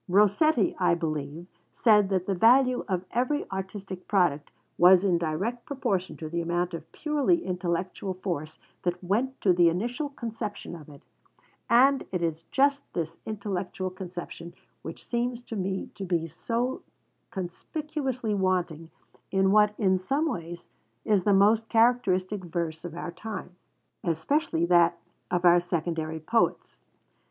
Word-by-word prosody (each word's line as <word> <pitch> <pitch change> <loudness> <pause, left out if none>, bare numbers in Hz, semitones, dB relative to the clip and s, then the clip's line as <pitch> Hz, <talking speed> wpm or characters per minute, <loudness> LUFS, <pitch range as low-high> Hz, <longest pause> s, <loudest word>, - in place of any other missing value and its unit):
Rossetti, 210 - +3
I 175 -2 +3
believe, 155 0 -4 0.3
said 210 -4 +4
that 185 -2 0
the 195 - 0
value 250 +6 +4
of 185 -2 -2
every 255 +5 0
artistic 190 -1 -6
product 175 -8 +1 0.3
was 180 +1 +7
in 180 -4 +2
direct 190 +10 -3
proportion 235 -10 -2
to 155 - -6
the 170 +2 -2
amount 175 +1 -1
of 165 -2 -7
purely 305 +2 +1
intellectual 180 +1 -2
force 170 -5 -4 0.2
that 175 +1 -2
went 235 +9 -1
to 185 - +4
the 175 -1 +5
initial 240 - -2
conception 225 -8 -6
of 155 -3 -12
it: 140 -1 -14 0.7
and 265 +3 +4
it 180 -2 -1
is 165 0 -2
just 280 +1 +3
this 165 -2 -4
intellectual 195 -3 -3
conception 175 -2 -8 0.3
which 160 +5 -9
seems 240 0 -2
to 230 - -7
me 190 -1 -3
to 195 - -7
be 175 -3 0
so 235 - -2 0.5
conspicuously 250 - -4
wanting 180 -4 -1 0.4
in 190 0 +2
what, 210 0 +4
in 190 -3 +2
some 275 - 0
ways, 175 - -5 0.4
is 200 -4 +2
the 205 - +4
most 210 +3 +4
characteristic 210 -5 +2
verse 165 -2 -3
of 170 -2 -7
our 175 0 -5
time, 185 0 -7 0.5
especially 170 - 0
that 170 -1 +4 0.3
of 180 0 0
our 175 0 +7
secondary 160 -2 -2
poets. 225 +9 0
185 Hz, 145 wpm, -27 LUFS, 170-230 Hz, 0.7 s, was